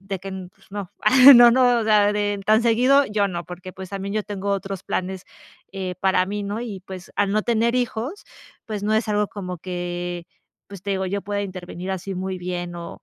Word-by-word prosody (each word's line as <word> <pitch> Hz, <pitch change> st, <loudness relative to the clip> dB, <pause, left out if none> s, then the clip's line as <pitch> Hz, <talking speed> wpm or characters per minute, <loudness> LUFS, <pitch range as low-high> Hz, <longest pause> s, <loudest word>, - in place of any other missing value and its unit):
de 195 Hz, 0 st, -5 dB
que 195 Hz, -, -8 dB
n 190 Hz, -1 st, -6 dB
no 180 Hz, -, -11 dB
no, -, -, -28 dB
pues -, -, -25 dB
no, 205 Hz, -, -3 dB, 0.2 s
ah 215 Hz, -, +5 dB, 0.2 s
ah, 275 Hz, -, +12 dB, 0.2 s
no, 245 Hz, -1 st, +4 dB
o 220 Hz, -, -2 dB
sea, 210 Hz, -1 st, +4 dB
de 205 Hz, -1 st, -1 dB
tan 220 Hz, +2 st, +4 dB
seguido, 255 Hz, +4 st, +4 dB
yo 210 Hz, -1 st, +1 dB
no. 175 Hz, -1 st, -5 dB
Porque, 180 Hz, +1 st, -9 dB
pues, 190 Hz, 0 st, -9 dB
también 195 Hz, 0 st, -4 dB
yo 215 Hz, -, 0 dB
tengo 200 Hz, -1 st, -4 dB
otros 195 Hz, -1 st, -3 dB
planes, 185 Hz, 0 st, -3 dB, 0.5 s
eh, 185 Hz, -2 st, -4 dB
para 190 Hz, -1 st, +2 dB
mí, 205 Hz, +1 st, -3 dB
¿no? 205 Hz, +3 st, -3 dB
Y 215 Hz, -6 st, -6 dB
pues, 190 Hz, -1 st, -9 dB
al 200 Hz, -1 st, +2 dB
no 215 Hz, 0 st, +1 dB
tener 235 Hz, 0 st, +1 dB
hijos, 250 Hz, -, -3 dB, 0.4 s
pues, 215 Hz, -3 st, -4 dB
no 215 Hz, -, +1 dB
es 220 Hz, +1 st, 0 dB
algo 210 Hz, -1 st, +1 dB
como 180 Hz, -3 st, -6 dB
que 175 Hz, 0 st, -5 dB, 0.4 s
pues 200 Hz, -2 st, -10 dB
te 200 Hz, -, -4 dB
digo, 190 Hz, -1 st, -1 dB
yo 200 Hz, +2 st, -2 dB
pueda 205 Hz, 0 st, -2 dB
intervenir 185 Hz, -1 st, -6 dB
así 190 Hz, +1 st, -4 dB
muy 185 Hz, 0 st, -4 dB
bien 175 Hz, -1 st, -4 dB
o 170 Hz, -1 st, -9 dB
195 Hz, 230 wpm, -23 LUFS, 185-215 Hz, 0.5 s, ah